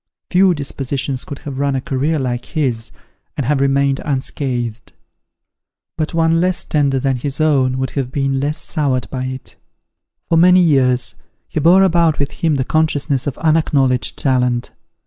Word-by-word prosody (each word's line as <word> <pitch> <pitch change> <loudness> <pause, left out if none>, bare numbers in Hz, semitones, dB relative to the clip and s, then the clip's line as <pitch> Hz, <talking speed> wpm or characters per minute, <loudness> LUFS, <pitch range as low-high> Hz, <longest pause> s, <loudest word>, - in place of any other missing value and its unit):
Few 185 -1 +4
dispositions 135 -2 -3
could 145 - -8
have 140 -2 -5
run 140 -1 0
a - - 0
career 140 +5 -1
like 125 -3 -3
his, 125 -7 -2 0.5
and 140 - -1
have 140 +1 +1
remained 140 0 +1
unscathed. 130 -4 -3 1.0
But 155 0 -3
one 165 0 +2
less 185 0 0
tender 140 -3 +1
than 135 0 0
his 140 +3 -5
own 135 -4 +2
would 130 -1 -2
have 135 -3 -3
been 135 -1 -1
less 145 +3 -2
soured 140 -5 -1
by 130 -1 -3
it. 130 0 -8 0.7
For 165 - +3
many 180 +2 +6
years, 130 -6 +2 0.3
he - - -3
bore 175 +5 +5
about 170 -4 +3
with 140 0 -2
him 160 -4 0
the 130 -2 -1
consciousness 145 -3 0
of 140 - -3
unacknowledged 145 -6 +1
talent. 125 -2 0
140 Hz, 160 wpm, -17 LUFS, 130-155 Hz, 1.0 s, many